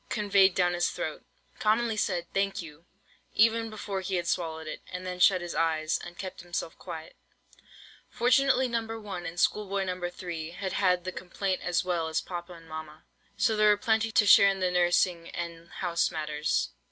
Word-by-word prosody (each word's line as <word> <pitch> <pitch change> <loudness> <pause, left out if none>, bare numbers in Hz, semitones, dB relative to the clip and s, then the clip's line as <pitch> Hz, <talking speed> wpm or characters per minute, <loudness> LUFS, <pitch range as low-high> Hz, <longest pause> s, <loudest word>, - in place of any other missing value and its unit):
conveyed 200 -3 +3
down 175 -1 +2
his 175 0 +1
throat: - - -5 0.4
commonly 220 +1 +2
said, 180 -4 0
"Thank 195 0 0
you," 165 -1 -10 0.5
even 225 +1 +4
before 205 -3 -4
he 190 0 -2
had 175 -1 -1
swallowed 160 -2 -2
it; 155 - -6
and 180 0 -6
then 180 0 -5
shut 185 0 +5
his 175 -1 -5
eyes, 160 -1 +1
and 175 0 -9
kept 185 -1 -6
himself 175 -2 -4
quiet. 160 0 -8 0.9
Fortunately 260 +1 +3
No. 235 -1 -1 0.2
1, 190 -5 -6
and 170 +2 -6
Schoolboy 200 0 +1
No. 180 -1 -3
3, 170 -3 -6
had 190 +1 -4
had 180 -2 +2
the 185 - -3
complaint 185 +1 -3
as 175 +1 0
well 170 -3 0
as 160 - 0
papa 175 0 -6
and 165 -1 -14
mamma, 155 -1 -8 0.3
so 220 +2 +2
there 215 0 +5
were 210 - +5
plenty 220 +1 +1
to 210 - +4
share 200 0 +8
in 195 0 -1
the 185 -1 +1
nursing 175 -1 +2
and 170 0 -6
house 170 -2 0
matters. 150 -1 -1
180 Hz, 185 wpm, -28 LUFS, 170-200 Hz, 0.9 s, share